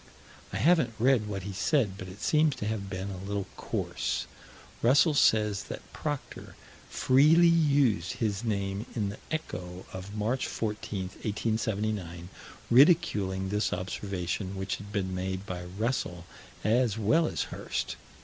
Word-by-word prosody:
I 95 - -3
haven't 130 - +3
read 120 -2 +3
what 100 -3 -4
he 100 +1 -5
said, 110 - +1
but 95 -1 -8
it 95 +3 -10
seems 155 -2 +3
to 120 - -5
have 105 -2 -3
been 95 +1 -4
a 95 0 -7
little 100 0 -2
coarse. - - -2 0.6
Russell 145 +6 +5
says 105 -7 +3
that - - -9
Proctor 145 -3 -5 0.3
"freely 155 +6 +5
used" 140 - +3
his 110 -4 -1
name 100 0 -2
in 105 -4 0
the 100 - -8
Echo, 90 - -5
of 95 +2 -7
March 110 +5 0
14, 105 -2 -3
1879, 105 -5 -2 0.4
ridiculing 105 - +4
this 105 +2 0
observation 95 0 -3
which 95 0 -2
had 100 0 -10
been 95 -3 -1
made 95 +1 -3
by 90 -2 -5
Russell 90 -3 -2 0.4
as 115 0 +2
well 155 +10 +3
as - - -1
Hirst. - - -3
105 Hz, 140 wpm, -29 LUFS, 95-125 Hz, 0.6 s, Russell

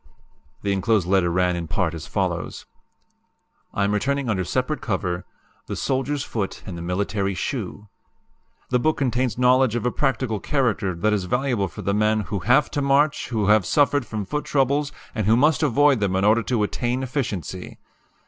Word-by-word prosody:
The 100 -1 +1
enclosed 100 0 +1
letter 95 -2 +3
ran 90 +1 +1
in 85 -1 -4
part 85 0 -1
as 80 - -7
follows: - - -2 1.1
"I 100 - -1
am 100 +1 +1
returning 135 +3 0
under 95 -3 0
separate 130 - -1
cover 90 -4 -2 0.4
'The - - -4
Soldiers' 135 +1 -1
Foot 105 -4 -4
and 95 - -6
the 85 - -6
Military 95 +2 -1
Shoe.' 105 +3 -4 0.8
"The 125 - +2
book 155 +5 +1
contains 125 -2 0
knowledge 125 -1 +4
of 120 - -2
a 125 - +2
practical 130 -6 -1
character 115 - 0
that 105 +5 +1
is 100 -3 0
valuable 125 -2 0
for 100 +4 -9
the 100 +2 0
men 105 +1 +2
who 100 0 -3
HAVE 125 - +3
TO 145 - -1
MARCH, 140 +2 +2
WHO 110 -4 -1
HAVE 105 -1 +5
SUFFERED 145 - +2
FROM 105 -2 -4
FOOT 150 +10 -3
TROUBLES, 140 +1 +1 0.2
AND 110 -4 -1
WHO 110 +2 +5
MUST 150 +4 +3
AVOID 145 -2 +4
THEM 100 -2 0
IN 95 +1 +1
ORDER 110 +2 +4
TO 115 -2 0
ATTAIN 120 +4 -1
EFFICIENCY. 110 - -4
110 Hz, 180 wpm, -23 LUFS, 100-130 Hz, 1.1 s, HAVE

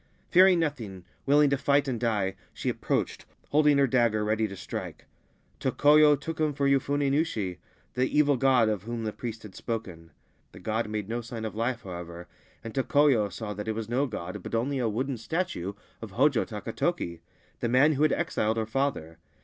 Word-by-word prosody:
Fearing 185 0 +7
nothing, 115 - -3 0.2
willing 145 0 +5
to 140 - +2
figh 140 +1 +2
and 125 -4 -2
die, 105 -5 0 0.2
she - - -2
approached, - - -2 0.2
holding 150 -1 +4
her 140 - +5
dagger 115 -4 +2
ready 110 +1 +1
t< 100 - -8
strike. - - -7 0.5
Tokoyo 150 0 +5
took 160 +3 -6
him 155 -1 +1
for 140 0 0
Yofune 140 +1 +1
Nushi, 110 - -1 0.3
the 130 +1 +1
evi 145 -3 +3
god 130 -4 +4
of 105 -4 -1
whom 115 +2 -5
the 110 -1 -3
priest 115 -2 -6
had 105 -3 -10
spoken. 95 -8 -5 0.4
The - - -11
god 110 +3 -2
made 105 -2 -3
nc 115 +1 -4
sign 115 -1 -6
of 110 - -4
life, 115 +2 -2
however, 85 -1 -8 0.4
and 115 - -7
Tokoyo 135 -5 +3
saw 105 +2 -5
that 105 +2 -6
it 110 - -1
was 110 0 -5
no 130 +4 +1
god 95 -3 -6
but 115 - -5
only 130 +4 0
a 120 -3 +1
wooden 130 +4 -2
statue 115 - -3 0.3
of 110 -4 -8
Hojo 130 +1 +3
Takatoki, 95 -5 -3 0.4
the 120 - -1
man 135 +6 +5
wh< 145 - -2
had 155 - +4
exiled 115 -10 0
her 110 - 0
father. 110 - -2
115 Hz, 190 wpm, -28 LUFS, 105-140 Hz, 0.5 s, Fearing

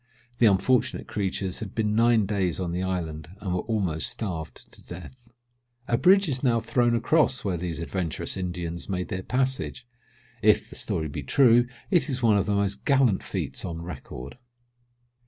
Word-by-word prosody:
The 115 - +6
unfortunate 120 +5 +2
creatures 95 -2 -2
had 105 -4 -7
been 105 -2 +1
nine 115 -1 +4
days 95 -4 -1
on 90 -2 -2
the 90 +1 -2
island, 80 -5 -3
and 95 -4 -3
were 90 - 0
almost 95 -9 -1
starved 85 -8 -6
to - - -13
death." 120 +8 -11 0.6
A 120 - +2
bridge 190 +8 +5
is 130 -4 -1
now 120 -4 +3
thrown 120 +1 +2
across 130 -1 +2
where 95 -3 0
these 85 -1 -3
adventurous 85 -1 -3
Indians 90 -2 -4
made 90 -2 -2
their 95 - -3
passage. 130 +2 -2 0.6
If 105 0 +3
the - - -9
story 80 - -1
be 75 0 -5
true, 120 - +4 0.2
it 175 -4 +3
is 130 -2 -3
one 110 -3 +5
of 100 - -1
the 105 - +1
most 100 0 -1
gallant 130 -8 +3
feats - - -4
on 85 -1 -5
record. 70 - -8
100 Hz, 175 wpm, -26 LUFS, 90-120 Hz, 0.6 s, The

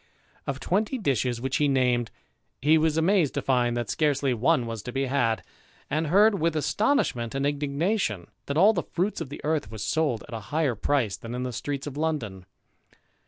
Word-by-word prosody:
Of 135 -1 -2
twenty 210 - 0
dishes 130 - 0
which 130 +2 -1
he 150 - +2
named, 125 -3 +2 0.5
he 150 +4 +4
was 160 0 +1
amazed 170 -2 +2
to - - 0
find 120 -2 +1
that 120 -3 -2
scarcely 140 -3 +1
one 125 +3 +2
was 115 -2 -5
to 125 - -6
be 135 +2 -1
had; 125 -4 0 0.5
and 155 +2 0
heard, 200 +4 +4
with 165 0 +1
astonishment 150 - 0
and 135 0 0
indignation, 145 - -1 0.2
that 140 - -2
all 200 +6 +6
the - - 0
fruits 190 +5 -2
of - - -5
the 145 - -8
earth 150 -8 -1
were 110 - -7
sold 130 +2 0
at - - -10
a 115 - -3
higher 150 -4 +1
price 115 -3 0
than 115 +4 -7
in 125 - -3
the 125 -1 -4
streets 140 +2 -4
of 145 -1 -6
London. 115 - -3
140 Hz, 195 wpm, -26 LUFS, 120-160 Hz, 0.5 s, all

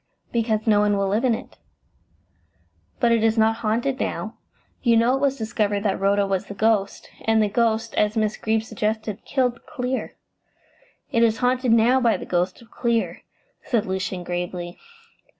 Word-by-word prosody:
"Because 220 -2 0
no 210 -2 +4
one 205 -1 +2
will 195 0 0
live 210 +5 0
in 245 -3 +3
it." - - -11 1.4
"But 235 -2 +3
it 230 -1 +3
is 225 0 +2
not 220 0 +3
haunted 235 +5 -1
now. - - -3 0.5
You 235 -3 +4
know 235 +2 +3
it 270 - 0
was 275 -1 +1
discovered 210 -3 -1
that 200 -3 0
Rhoda 200 +1 +2
was 195 -1 -2
the 200 - -8
ghost, 210 -1 0
and 225 0 +3
the 215 - +3
ghost, 225 +1 0
as 210 +1 +1
Miss 215 -1 +1
Greeb 220 0 0
suggested, 220 -1 -3
killed 250 -3 0
Clear." 260 -3 -3 1.0
"It 230 - +2
is 225 -1 +3
haunted 250 0 +1
now 230 +3 +5
by 235 -3 +3
the - - -8
ghost 180 +5 -1
of 230 - -22
Clear," 235 -2 -1 0.4
said 230 -5 0
Lucian 190 -1 -3
gravely. 175 0 -4
220 Hz, 170 wpm, -23 LUFS, 205-235 Hz, 1.4 s, now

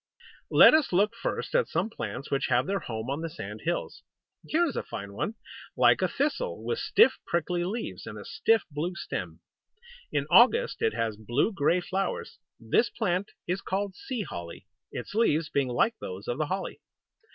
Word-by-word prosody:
Let - - +8
us 310 -3 +3
look 205 +5 +3
first - - -3
at - - +3
some 220 - -1
plants 140 - -6
which 140 0 +1
have 125 +1 +2
their 195 +3 -1
home 110 -7 -5
on 145 +3 -2
the 165 - -3
sand 165 - -8
hills. - - -2 0.5
Here 340 +3 +3
is 300 - -3
a - - 0
fine 100 0 -7
one, 210 - -3 0.4
like - - +5
a - - +3
thistle, 475 - -2
with 460 - -2
stiff 450 - +4
prickly 175 +1 0
leaves, 215 +6 -4
and - - -7
a - - -9
stiff 225 -10 +2
blue 165 +5 -3
stem. - - -5 0.7
In - - 0
August 485 +1 +5
it 450 - +1
has 110 -2 -1
blue 120 - 0
grey 175 +1 +2
flowers. 190 0 -3 0.2
This 115 - +2
plant 195 -2 -1 0.2
is 180 +2 -2
called 195 +1 -2
Sea 235 +4 -4
Holly, 85 - -8 0.3
its - - -6
leaves 165 -8 +2
being 140 -2 +1
like 125 - +2
those 95 +3 -7
of 120 +4 -2
the 155 - 0
holly. 190 +3 -4
180 Hz, 185 wpm, -28 LUFS, 140-230 Hz, 0.7 s, Let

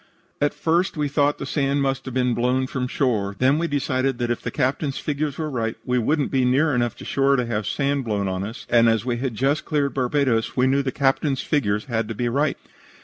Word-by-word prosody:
"At 145 - +1
first 170 +2 +1
we 150 -1 0
thought 145 0 +1
that 135 - -5
the - - -6
sand 140 -1 +1
must 135 0 -1
have 130 - -6
been 125 -1 +2
blown 125 +2 +1
from 130 -1 -3
shore. 110 -8 0
Then 135 +6 +3
we 170 - 0
decided 135 -3 0
that 120 -1 -1
if 120 - -2
the - - -3
Captain's 135 +1 -1
figures 150 -1 -2
were 155 - -2
right 115 -6 -2
we 125 0 +1
wouldn't 145 +4 0
be 130 -2 +2
near 135 +5 +3
enough 120 -1 0
to - - -11
shore 140 0 +2
to 125 -2 0
have 110 -4 -2
sand 140 -2 0
blow 100 -3 -1
on 95 0 -2
us, 110 +3 -7
and 115 -1 +5
as 115 0 +1
we 120 -2 -1
had 125 -2 -3
just 135 +6 +1
cleared 145 -3 0
Barbados, 130 -3 0
we 125 - +4
knew 135 +1 +3
that - - -8
the 130 - 0
Captain's 135 0 +1
figures 105 -9 0
had 115 -3 -1
to 115 - -5
be 120 +2 -1
right. 140 +4 0
130 Hz, 245 wpm, -23 LUFS, 120-140 Hz, -, and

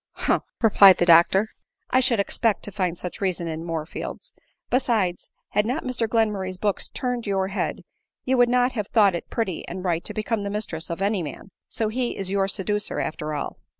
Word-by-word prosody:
" - - -68
Humph - - +2
!" - - -62
replied 200 -3 +8
the 175 - +2
doctor, 175 +5 +5 0.2
" - - -52
I 255 - +5
should 250 -4 +3
expect 210 +2 +1
to 205 - -5
find 180 -3 -1
such 180 +3 -7
reason 180 -3 -1
in 160 0 -4
Moorfields; 165 -1 -6 0.4
besides, 220 -8 0 0.2
had 210 - +2
not 250 +9 -2
Mr 240 -3 -1
Glenmurray's 210 -5 0
books 205 +1 0
turned 245 -3 -3
your 190 -1 0
head, 200 - -3 0.4
you 260 - +2
would 245 -1 +4
not 250 +1 +3
have 210 -5 -3
thought 205 -5 +4
it 170 - -5
pretty 205 -7 -2
and 180 +1 -6
right 170 -2 0
to - - -4
become 215 0 -1
the 200 - -3
mistress 200 -6 -4
of 170 +3 -3
any 200 -1 +1
man; 160 +5 -8 0.2
so 220 - -1
he 245 +2 -2
is 195 -1 -3
your 195 -1 +1
seducer, 205 +1 -1
after 155 0 -3
all." 145 - -4
200 Hz, 210 wpm, -24 LUFS, 180-225 Hz, 0.4 s, replied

